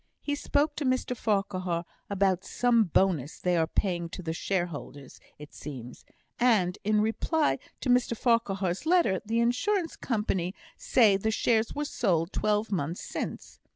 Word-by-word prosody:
He 290 Hz, -, -3 dB
spoke 290 Hz, +1 st, 0 dB
to 295 Hz, -, -2 dB
Mr 255 Hz, -1 st, 0 dB
Farquhar 185 Hz, -6 st, -1 dB, 0.2 s
about 195 Hz, -2 st, +1 dB
some 240 Hz, -3 st, +2 dB
bonus 165 Hz, -5 st, +1 dB
they 180 Hz, -1 st, 0 dB
are 165 Hz, -1 st, +2 dB
paying 175 Hz, -3 st, -1 dB
to 185 Hz, -, -7 dB
the 160 Hz, -1 st, -2 dB
shareholders, 165 Hz, -7 st, -4 dB, 0.2 s
it 150 Hz, 0 st, -12 dB
seems; 125 Hz, -4 st, -9 dB, 0.3 s
and, 210 Hz, -7 st, +3 dB
in 210 Hz, 0 st, +2 dB
reply 290 Hz, +8 st, +1 dB, 0.2 s
to 260 Hz, -, -2 dB
Mr 245 Hz, -2 st, +2 dB
Farquhar's 200 Hz, -, 0 dB
letter, 335 Hz, -, +3 dB
the 225 Hz, +2 st, 0 dB
Insurance 330 Hz, -, +1 dB
Company 205 Hz, -5 st, -1 dB, 0.2 s
say 235 Hz, -, +4 dB
the 220 Hz, +3 st, -1 dB
shares 220 Hz, 0 st, +1 dB
were 295 Hz, +1 st, -1 dB
sold 180 Hz, -, 0 dB
twelve 210 Hz, +1 st, 0 dB
months 170 Hz, -2 st, -2 dB
since. -, -, -6 dB
205 Hz, 150 wpm, -28 LUFS, 175-245 Hz, 0.3 s, say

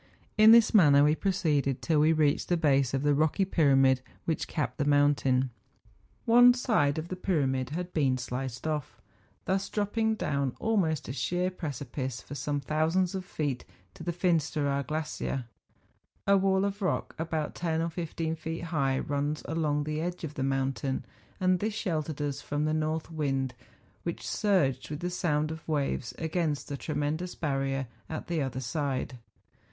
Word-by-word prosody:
In 215 Hz, +1 st, +8 dB
this 230 Hz, -1 st, +7 dB
manner 145 Hz, -9 st, +7 dB
we 150 Hz, +1 st, +5 dB
proceeded 155 Hz, -7 st, 0 dB
till 160 Hz, -3 st, +2 dB
we 155 Hz, +2 st, +5 dB
reached 155 Hz, -3 st, +2 dB
the 175 Hz, -, +3 dB
base 140 Hz, -5 st, +2 dB
of 135 Hz, -, -1 dB
the 145 Hz, 0 st, +3 dB
rocky 155 Hz, +6 st, +2 dB
pyramid 135 Hz, -7 st, +4 dB, 0.2 s
which 160 Hz, -, -1 dB
capped 150 Hz, 0 st, -3 dB
the -, -, +2 dB
mountain. 145 Hz, -3 st, +3 dB, 0.7 s
One 245 Hz, +1 st, +7 dB
side 160 Hz, -, +1 dB
of 160 Hz, +2 st, -4 dB
the 185 Hz, -, -3 dB
pyramid 135 Hz, -9 st, 0 dB
had 175 Hz, +4 st, -4 dB
been 135 Hz, -5 st, +2 dB
sliced 125 Hz, 0 st, -5 dB
off, 150 Hz, -3 st, -3 dB, 0.5 s
thus 195 Hz, +1 st, 0 dB
THE -, -, -27 dB
FINSTERAAKHORN. -, -, 0 dB
43 225 Hz, -1 st, +1 dB
dropping 220 Hz, -, +2 dB
down 140 Hz, -, -1 dB
almost 185 Hz, -9 st, 0 dB
a 125 Hz, -, -4 dB
sheer 180 Hz, +5 st, -1 dB
precipice 140 Hz, -6 st, -4 dB
for -, -, -10 dB
some 145 Hz, 0 st, -2 dB
thousands 160 Hz, +6 st, +1 dB
of 190 Hz, -1 st, -3 dB
feet 145 Hz, -8 st, -3 dB, 0.3 s
to -, -, -13 dB
the 175 Hz, -, -1 dB
Finsteraar 155 Hz, -5 st, +1 dB
glacier. 155 Hz, -4 st, -3 dB, 0.8 s
A 200 Hz, -, +5 dB
wall 195 Hz, 0 st, +3 dB
of 200 Hz, +1 st, -3 dB
rock, 185 Hz, -, -1 dB
about 160 Hz, -2 st, -2 dB
ten 165 Hz, -2 st, -1 dB
or 165 Hz, +1 st, -1 dB
fifteen 165 Hz, -1 st, -3 dB
feet 165 Hz, +1 st, -5 dB
high, 140 Hz, -6 st, 0 dB
runs 145 Hz, +2 st, -2 dB
along 150 Hz, -2 st, 0 dB
the 155 Hz, +1 st, -2 dB
edge 175 Hz, +1 st, -4 dB
of 155 Hz, -2 st, -4 dB
the 135 Hz, -, -5 dB
mountain, 135 Hz, 0 st, -1 dB, 0.3 s
and 185 Hz, -1 st, +3 dB
this 215 Hz, +2 st, -2 dB
sheltered 155 Hz, -7 st, -2 dB
us 145 Hz, -1 st, -3 dB
from 145 Hz, +1 st, -2 dB
the 155 Hz, -, +1 dB
north 155 Hz, +1 st, -1 dB
wind, 135 Hz, -4 st, -1 dB, 0.5 s
which, -, -, -5 dB
surged 185 Hz, -11 st, +1 dB
with 150 Hz, +1 st, -5 dB
the 180 Hz, +1 st, -2 dB
sound 155 Hz, -4 st, 0 dB
of 160 Hz, -1 st, -8 dB
waves 140 Hz, -5 st, -1 dB
against 160 Hz, -2 st, -1 dB
the 145 Hz, -, -3 dB
tremendous 155 Hz, +4 st, -2 dB
barrier 135 Hz, -3 st, -1 dB, 0.2 s
at 160 Hz, -, -5 dB
the 170 Hz, -3 st, -1 dB
other 130 Hz, -2 st, -2 dB
side. 135 Hz, -2 st, -2 dB
155 Hz, 175 wpm, -29 LUFS, 140-175 Hz, 0.8 s, In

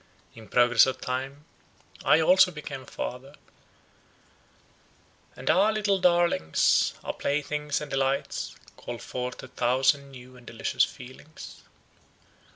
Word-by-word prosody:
In 110 Hz, -1 st, -13 dB
progress 120 Hz, +3 st, +5 dB
of 130 Hz, -, -3 dB
time, 135 Hz, +3 st, -5 dB, 0.6 s
I 160 Hz, -, +4 dB
also 185 Hz, +3 st, +5 dB
became 150 Hz, -5 st, -8 dB
a -, -, -15 dB
father, 135 Hz, +3 st, -7 dB, 2.0 s
and -, -, -11 dB
our 200 Hz, +5 st, +4 dB
little 210 Hz, -2 st, 0 dB
darlings, 175 Hz, -, +2 dB
our -, -, -4 dB
playthings 150 Hz, +1 st, -2 dB
and 150 Hz, -, -7 dB
delights, 135 Hz, 0 st, -2 dB, 0.2 s
called -, -, -8 dB
forth 125 Hz, 0 st, -5 dB
a -, -, -9 dB
thousand 130 Hz, +3 st, +1 dB
new 130 Hz, -1 st, -13 dB
and 125 Hz, -, -18 dB
delicious -, -, 0 dB
feelings. 130 Hz, +5 st, -9 dB
135 Hz, 120 wpm, -26 LUFS, 125-155 Hz, 2.0 s, progress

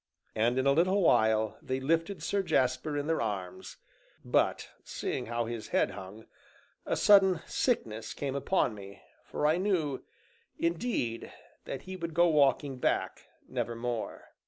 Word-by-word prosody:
And 120 Hz, +3 st, +1 dB
in 130 Hz, -, +1 dB
a 140 Hz, -, +5 dB
little 185 Hz, +6 st, +3 dB
while 110 Hz, -6 st, +3 dB
they 130 Hz, 0 st, -2 dB
lifted 165 Hz, +5 st, 0 dB
Sir 200 Hz, +3 st, 0 dB
Jasper 145 Hz, -2 st, 0 dB
in 145 Hz, -, -2 dB
their 165 Hz, +1 st, 0 dB
arms, 100 Hz, -5 st, -5 dB, 0.5 s
but -, -, +1 dB, 0.2 s
seeing -, -, -4 dB
how 120 Hz, 0 st, -1 dB
his 115 Hz, -1 st, -5 dB
head -, -, +1 dB
hung, 100 Hz, +3 st, -10 dB, 0.6 s
a -, -, 0 dB
sudden 190 Hz, -5 st, +5 dB
sickness 115 Hz, -, -1 dB
came 140 Hz, -2 st, -3 dB
upon 140 Hz, -, +1 dB
me, 100 Hz, -1 st, -11 dB, 0.2 s
for -, -, -3 dB
I 155 Hz, +3 st, +4 dB
knew, 175 Hz, -8 st, 0 dB, 0.5 s
indeed, 165 Hz, -, -2 dB, 0.3 s
that -, -, -6 dB
he 185 Hz, -, -7 dB
would 170 Hz, -3 st, -5 dB
go 175 Hz, +1 st, +5 dB
walking 140 Hz, -3 st, +2 dB
back -, -, -1 dB, 0.2 s
nevermore. 120 Hz, 0 st, -4 dB
140 Hz, 145 wpm, -30 LUFS, 115-170 Hz, 0.6 s, a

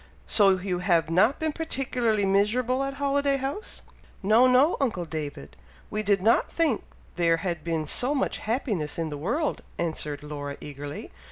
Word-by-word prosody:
So 195 Hz, -3 st, +4 dB
you 180 Hz, -1 st, -2 dB
have 170 Hz, -3 st, +2 dB
not 215 Hz, -, +4 dB
been 315 Hz, -1 st, -1 dB
particularly 250 Hz, -9 st, 0 dB
miserable 230 Hz, +7 st, +2 dB
at 275 Hz, 0 st, -3 dB
Holiday 280 Hz, 0 st, +1 dB
House?" 275 Hz, -, -5 dB, 0.4 s
"No! 220 Hz, +6 st, +5 dB
no! 260 Hz, +6 st, +5 dB
uncle 215 Hz, -10 st, 0 dB
David! 145 Hz, -, -6 dB, 0.4 s
we 215 Hz, -, -1 dB
did 200 Hz, -2 st, +1 dB
not 225 Hz, +2 st, +3 dB
think 315 Hz, -9 st, +1 dB, 0.4 s
there 165 Hz, -1 st, +3 dB
had 170 Hz, -2 st, -3 dB
been 165 Hz, -1 st, -1 dB
so 250 Hz, -, 0 dB
much 270 Hz, -, -1 dB
happiness 215 Hz, -, -2 dB
in 165 Hz, -2 st, -2 dB
the 145 Hz, -, -4 dB
world," 295 Hz, -, -1 dB, 0.2 s
answered 150 Hz, -3 st, -3 dB
Laura, 145 Hz, -1 st, -6 dB
eagerly. 145 Hz, 0 st, -7 dB
200 Hz, 160 wpm, -26 LUFS, 165-260 Hz, 0.4 s, No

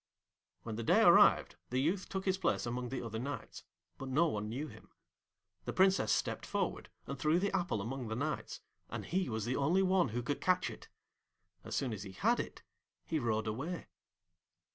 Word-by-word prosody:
When 110 Hz, -2 st, -5 dB
the 115 Hz, -, -3 dB
day -, -, +5 dB
arrived -, -, +6 dB
the 125 Hz, -, 0 dB
youth 175 Hz, +8 st, 0 dB
took 190 Hz, -1 st, -3 dB
his 190 Hz, -1 st, +1 dB
place -, -, +1 dB
among 125 Hz, +1 st, -3 dB
the 130 Hz, -1 st, -4 dB
other 110 Hz, -1 st, -4 dB
Knights, 140 Hz, +4 st, -6 dB, 0.3 s
but 135 Hz, -, -5 dB
no 150 Hz, +6 st, +4 dB
one 105 Hz, -3 st, -3 dB
knew 130 Hz, +7 st, -3 dB
him. -, -, -14 dB, 0.8 s
The -, -, -3 dB
Princess 190 Hz, -, +4 dB
stepped -, -, 0 dB
forward -, -, -2 dB, 0.2 s
and 140 Hz, -, -6 dB
threw 155 Hz, +2 st, +3 dB
the 195 Hz, +2 st, 0 dB
apple 175 Hz, -, 0 dB
among 125 Hz, +3 st, -4 dB
the 110 Hz, -, -3 dB
Knights, 150 Hz, +5 st, -3 dB, 0.3 s
and -, -, -5 dB
he 185 Hz, -2 st, 0 dB
was 110 Hz, -2 st, -2 dB
the 125 Hz, +2 st, -1 dB
only 170 Hz, +8 st, +3 dB
one 185 Hz, -6 st, +3 dB
who 120 Hz, +3 st, -3 dB
could 145 Hz, +4 st, -2 dB
catch 185 Hz, 0 st, +2 dB
it. -, -, -12 dB, 0.7 s
As -, -, -5 dB
soon 130 Hz, -4 st, 0 dB
as 105 Hz, -, -5 dB
he 95 Hz, -2 st, -8 dB
had 95 Hz, -, +2 dB
it -, -, -5 dB, 0.4 s
he 160 Hz, -, -1 dB
rode 110 Hz, -4 st, 0 dB
away. 140 Hz, +11 st, -4 dB
135 Hz, 195 wpm, -34 LUFS, 115-175 Hz, 0.8 s, arrived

